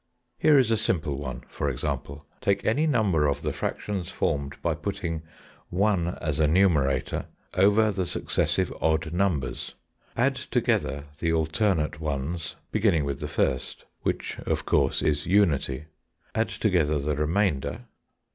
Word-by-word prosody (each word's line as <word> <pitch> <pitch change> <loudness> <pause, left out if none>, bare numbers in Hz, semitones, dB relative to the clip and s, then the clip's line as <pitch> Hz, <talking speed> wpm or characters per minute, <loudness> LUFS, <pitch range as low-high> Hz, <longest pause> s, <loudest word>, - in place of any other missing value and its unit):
Here 150 -2 +6
is 125 -4 +4
a 110 - +3
simple 80 -9 -1
one, 65 -4 -5
for 75 - -2
example:—Take 75 +9 -3
any 145 +9 +2
number 100 - +3
of 70 +1 -1
the 75 -2 -1
fractions 95 +1 -3
formed 70 -1 -2
by 85 - +2
putting 80 0 -3 0.5
one 90 -2 +1
as 75 -2 -2
a 75 - +4
numerator 75 -6 +2 0.3
over 105 +3 +4
the 95 -3 -2
successive - - 0
odd 80 +1 +1
numbers. 85 -8 -1 0.4
Add - - +3
together 70 +1 0 0.2
the 85 - +1
alternate 80 -1 +1
ones 80 +2 -3 0.2
beginning 100 -9 +2
with 70 -1 -3
the 75 - -3
first, 65 -3 -1 0.2
which, - - -2
of - - -2
course, - - +2
is 75 -1 +1
unity. 75 -8 +2 0.5
Add 110 +1 +1
together 85 -8 +1
the 75 +1 -1
remainder. 80 - 0
80 Hz, 135 wpm, -26 LUFS, 75-100 Hz, 0.5 s, Here